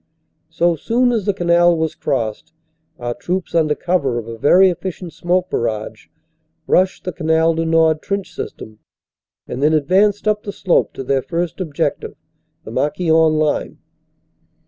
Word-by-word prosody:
So 170 Hz, +1 st, +1 dB
soon 245 Hz, -, +1 dB
as 220 Hz, -4 st, -1 dB
the 205 Hz, -, +2 dB
canal 175 Hz, -1 st, +3 dB
was 160 Hz, -1 st, -1 dB
crossed, 115 Hz, +1 st, -3 dB, 0.4 s
our 120 Hz, 0 st, -3 dB
troops, 180 Hz, +7 st, -4 dB
under 155 Hz, -3 st, +2 dB
cover 145 Hz, -9 st, 0 dB
of 115 Hz, -1 st, -5 dB
a 115 Hz, -, -6 dB
very 180 Hz, +10 st, +5 dB
efficient 175 Hz, 0 st, -6 dB
smoke 180 Hz, +1 st, 0 dB
barrage, 110 Hz, -1 st, -3 dB, 0.6 s
rushed 185 Hz, +3 st, +1 dB
the 180 Hz, -, -3 dB
Canal 160 Hz, -1 st, +1 dB
du 165 Hz, 0 st, -1 dB
Nord 160 Hz, -1 st, +3 dB
trench 195 Hz, -3 st, -4 dB
system 110 Hz, -8 st, -8 dB, 0.7 s
and 125 Hz, -, -5 dB
then 150 Hz, +2 st, +3 dB
advanced 195 Hz, +8 st, +2 dB
up 210 Hz, 0 st, +1 dB
the 200 Hz, -, -6 dB
slope 185 Hz, -3 st, +1 dB
to -, -, -6 dB
their 135 Hz, +1 st, 0 dB
first 170 Hz, +4 st, -3 dB
objective, 155 Hz, -5 st, -3 dB, 0.5 s
the -, -, -9 dB
Marquion 160 Hz, +1 st, +2 dB
line. 155 Hz, -1 st, -1 dB
165 Hz, 150 wpm, -19 LUFS, 150-185 Hz, 0.7 s, very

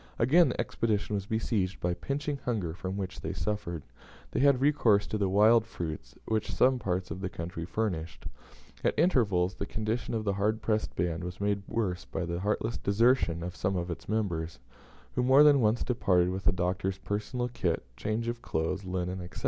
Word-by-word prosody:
Again 160 Hz, +9 st, +5 dB
the -, -, -4 dB
Expedition 110 Hz, -2 st, -1 dB
was 100 Hz, -1 st, -2 dB
besieged 105 Hz, -4 st, -1 dB
by 90 Hz, 0 st, 0 dB
pinching 140 Hz, +7 st, -3 dB
hunger 105 Hz, -10 st, -1 dB
from 95 Hz, +3 st, -5 dB
which 95 Hz, -2 st, -5 dB
they -, -, -3 dB
suffered; 85 Hz, -7 st, -3 dB, 0.5 s
they -, -, -1 dB
had 140 Hz, -1 st, +5 dB
recourse 120 Hz, -8 st, +3 dB
to 110 Hz, -, -3 dB
the 100 Hz, -2 st, +1 dB
wild 110 Hz, +4 st, +5 dB
fruits 85 Hz, -8 st, -6 dB
which 110 Hz, -1 st, -1 dB
some 130 Hz, 0 st, +3 dB
parts 90 Hz, -4 st, -2 dB
of 90 Hz, +3 st, -5 dB
the 95 Hz, -, -2 dB
country 85 Hz, -1 st, -5 dB
furnished. 85 Hz, -5 st, -3 dB, 0.6 s
At -, -, +1 dB
intervals 105 Hz, -, +3 dB
the 100 Hz, -, -5 dB
condition 110 Hz, +2 st, -2 dB
of 110 Hz, -, -1 dB
the 100 Hz, -2 st, 0 dB
hard 105 Hz, +3 st, 0 dB
pressed 110 Hz, -1 st, -1 dB
band 85 Hz, 0 st, -1 dB
was 90 Hz, +1 st, -6 dB
made 100 Hz, 0 st, 0 dB
worse 95 Hz, -6 st, -1 dB
by 90 Hz, -, -3 dB
the 85 Hz, +1 st, -3 dB
heartless 105 Hz, +3 st, -1 dB
desertion 100 Hz, -5 st, +2 dB
of 90 Hz, +1 st, -5 dB
some 95 Hz, +3 st, -1 dB
of 90 Hz, 0 st, -2 dB
its 85 Hz, -, -7 dB
members, 85 Hz, -7 st, -1 dB, 0.6 s
who -, -, 0 dB
more 130 Hz, +4 st, +7 dB
than 145 Hz, -3 st, +6 dB
once 110 Hz, +1 st, +2 dB
departed 90 Hz, -7 st, +2 dB
with 95 Hz, +1 st, -5 dB
the -, -, +5 dB
Doctor's 90 Hz, +1 st, -1 dB
personal 105 Hz, +5 st, -2 dB
kit, 90 Hz, -9 st, -1 dB
changes 110 Hz, -, -2 dB
of 120 Hz, 0 st, -10 dB
clothes, 90 Hz, +3 st, -2 dB
linen, 90 Hz, 0 st, -3 dB
&c. -, -, -5 dB
100 Hz, 190 wpm, -29 LUFS, 90-115 Hz, 0.6 s, more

